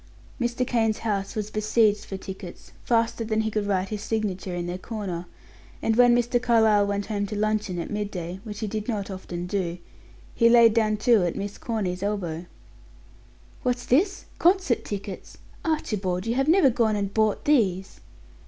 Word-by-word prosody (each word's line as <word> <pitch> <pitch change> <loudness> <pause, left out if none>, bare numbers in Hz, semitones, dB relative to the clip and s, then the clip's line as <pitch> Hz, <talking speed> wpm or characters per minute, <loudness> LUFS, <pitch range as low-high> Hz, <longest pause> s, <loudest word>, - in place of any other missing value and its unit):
Mr. 240 +1 0
Kane's 225 -3 +1
house 200 -2 -1
was 215 -1 -3
besieged 215 0 +2
for 195 - -5
tickets, 190 -2 -9
faster 230 -1 +1
than 220 0 0
he 220 0 -2
could 210 -1 -1
write 190 -1 0
his 210 -1 -4
signature 200 -4 -2
in 175 0 -3
their 175 +1 -4
corner; 185 -6 -5 0.5
and 225 - +1
when 245 0 +6
Mr. 245 0 +1
Carlyle 220 -4 +4
went 200 0 -1
home 205 -2 -2
to 210 - -5
luncheon 210 -3 0
at 170 - -4
midday, 190 -4 -4
which 210 -2 -7
he 215 - -1
did 215 +1 -4
not 205 -4 -2
often 175 -2 -6
do, 180 -2 -2 0.6
he 230 -1 +4
laid 235 -2 +7
down 215 -2 +2
two 215 -2 +4
at 175 - -1
Miss 200 0 -5
Corny's 195 -6 -2
elbow. 180 -5 -3 1.1
"What's 245 -1 -1
this? 375 +10 +2
Concert 355 - +3
tickets! 200 -1 -7 0.3
Archibald, 200 - -1
you 230 - 0
have 270 +3 +1
never 330 -5 +5
gone 225 -2 +2
and 200 -1 -2
bought 215 -2 +1
these!" 195 -10 +1
210 Hz, 170 wpm, -25 LUFS, 195-230 Hz, 1.1 s, laid